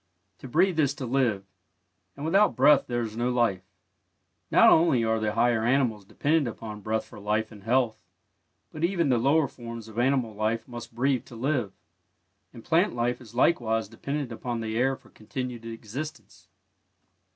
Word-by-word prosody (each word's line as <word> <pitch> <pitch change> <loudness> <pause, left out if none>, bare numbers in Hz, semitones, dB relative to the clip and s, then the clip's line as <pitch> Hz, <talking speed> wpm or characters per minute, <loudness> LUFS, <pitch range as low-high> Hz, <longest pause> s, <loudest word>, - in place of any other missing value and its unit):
To - - -9
breathe 170 +5 +2
is 140 -2 +2
to 135 - -5
live, 120 -6 0 0.7
and 140 - -6
without 195 +6 +3
breath 140 +2 +5
there 120 -1 -1
is 110 -1 -6
no 120 +2 0
life. 120 -7 +1 0.9
Not - - +6
only 160 -8 +4
are 110 0 +1
the 105 -1 -1
higher 120 -2 +2
animals 120 -5 +1
dependent 150 +6 +1
upon 110 -2 -7
breath 110 +2 -1
for - - -13
life 105 +2 -1
and 105 -2 -12
health, 120 +1 +1 0.7
but 155 - -6
even 170 -4 +1
the 125 -2 +3
lower 140 +4 +3
forms 115 -2 -9
of 110 +1 -6
animal 125 -3 +1
life 110 +2 -1
must 120 -2 -9
breathe 130 0 +1
to 120 - -12
live, 125 -4 -1 0.8
and 115 -2 -13
plant 175 +6 +2
life 120 +1 -1
is 120 -1 -14
likewise 115 -5 +2
dependent 140 -3 -4
upon 120 +1 -4
the 110 0 -3
air 130 +3 +2
for - - -21
continued 120 +1 -6
existence. 115 - -8
120 Hz, 170 wpm, -27 LUFS, 110-140 Hz, 0.9 s, Not